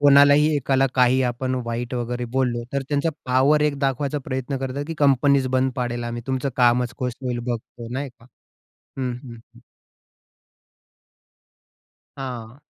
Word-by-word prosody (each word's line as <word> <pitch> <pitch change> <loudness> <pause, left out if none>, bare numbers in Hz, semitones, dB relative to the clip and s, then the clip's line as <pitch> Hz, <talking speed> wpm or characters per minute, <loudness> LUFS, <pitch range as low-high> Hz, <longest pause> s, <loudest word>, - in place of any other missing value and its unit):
कोणालाही 145 +2 +6
एकाला 135 0 +2
काही 130 +1 +4
आपण 130 +1 -1
वाईट 120 +2 -3
वगैरे 120 0 -2
बोललो 120 -3 +1
तर, 140 0 0
त्यांचा 145 +2 +1 0.2
पॉवर 135 +4 +4
एक 145 -2 +1
दाखवायचा 140 +1 0
प्रयत्न 130 0 -3
करतात 135 +2 -3
की 165 - -4
कंपनीच 140 -1 +4
बंद 130 0 +1
पाडेल 120 -1 -2
आम्ही, 120 0 -4
तुमचं 130 +1 -1
कामंच 120 -1 +3
कस 125 -1 -1
होईल 125 -2 -2
बघतो, 120 -1 -5
नाही 140 +2 -3
का. 120 -1 -20 0.7
हं, 130 -2 -1
हं. 120 - -9 0.2
हं. 120 - -15 2.6
हां. 125 -2 -7
130 Hz, 140 wpm, -23 LUFS, 120-140 Hz, 2.6 s, कोणालाही